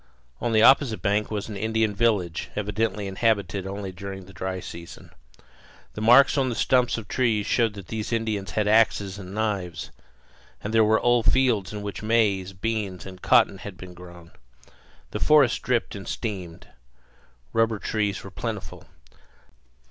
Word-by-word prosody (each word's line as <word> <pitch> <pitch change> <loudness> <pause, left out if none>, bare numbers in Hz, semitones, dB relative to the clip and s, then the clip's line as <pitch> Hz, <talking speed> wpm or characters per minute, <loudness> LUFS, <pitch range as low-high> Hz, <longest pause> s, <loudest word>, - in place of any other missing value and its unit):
On 120 - -1
the 110 -1 +4
opposite 130 -4 +5
bank 105 +1 +1
was 105 -2 -3
an 110 - -7
Indian 110 +1 0
village, 100 -6 0
evidently 105 0 -1
inhabited 100 -2 0
only 100 0 -5
during 95 +1 -8
the 95 - -15
dry 95 0 -4
season. 85 -1 -10 0.8
The 105 - -6
marks 130 +6 +6
on 130 -1 +1
the 120 - -3
stumps 125 +3 +2
of 110 -3 -7
trees 110 -4 +1
showed 115 -2 +1
that 100 -3 -10
these 110 0 -4
Indians 110 -4 -2
had 105 -1 0
axes 105 -2 +2
and 95 0 -9
knives; 95 -6 -3 0.7
and 105 - -4
there 115 -1 +5
were 110 +1 +3
old 120 -1 +3
fields 120 -8 +1
in 105 -1 -6
which 100 -1 -5
maize, 105 -4 +1
beans, 100 -1 -3
and 95 -1 -10
cotton 95 - +4
had 100 -3 -9
been 90 0 -10
grown. 85 -1 -13 0.8
The - - -3
forest 145 -5 +4
dripped 125 -2 0
and 100 -1 -8
steamed. 95 -7 -5 0.9
Rubber 115 -1 +2
trees 105 -1 -2
were - - -10
plentiful. - - -6
105 Hz, 160 wpm, -25 LUFS, 95-115 Hz, 0.9 s, marks